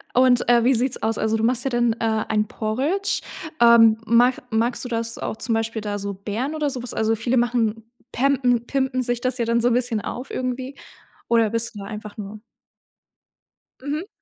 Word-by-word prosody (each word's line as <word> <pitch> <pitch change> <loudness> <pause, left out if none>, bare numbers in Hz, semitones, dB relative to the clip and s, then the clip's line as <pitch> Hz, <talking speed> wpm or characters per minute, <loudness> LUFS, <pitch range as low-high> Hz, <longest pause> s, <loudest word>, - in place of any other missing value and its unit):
Und, 250 -1 +4
äh, 240 -1 +5
wie 260 +2 +4
sieht's 250 +2 +1
aus? 220 0 0
Also, 220 0 0
du 220 - -2
machst 250 +1 +2
ja - - +1
dann, 240 -2 +1
äh, 220 -1 -1
ein 215 -1 +1
Porridge. 280 - -1 0.4
Ähm, 230 -2 +7
mach 245 +3 +4
magst 235 +3 0
du - - -5
das 230 0 -2
auch 220 - -4
zum 230 - -2
Beispiel 225 0 -2
da 205 -1 -3
so 200 0 -4
Beeren 220 +10 -4
oder 300 -2 0
so 255 -3 -4
was? 245 - -2
Also, 220 0 +1
viele 240 +3 0
machen 230 -2 0 0.3
pämpen 250 -3 +1
pimpen 265 -1 -1
sich 245 -1 -1
das 255 0 0
ja 235 - 0
dann 235 0 +1
so 245 +1 +2
bisschen 240 -3 0
auf 250 +5 -6
irgendwie, 255 +2 -4 0.5
oder 230 -2 +3
bist 230 0 -1
du - - -7
da 195 - -7
einfach 210 +1 -8
nur 210 +1 -7 1.4
Mhm. 300 +7 -4
235 Hz, 200 wpm, -22 LUFS, 220-255 Hz, 1.4 s, Ähm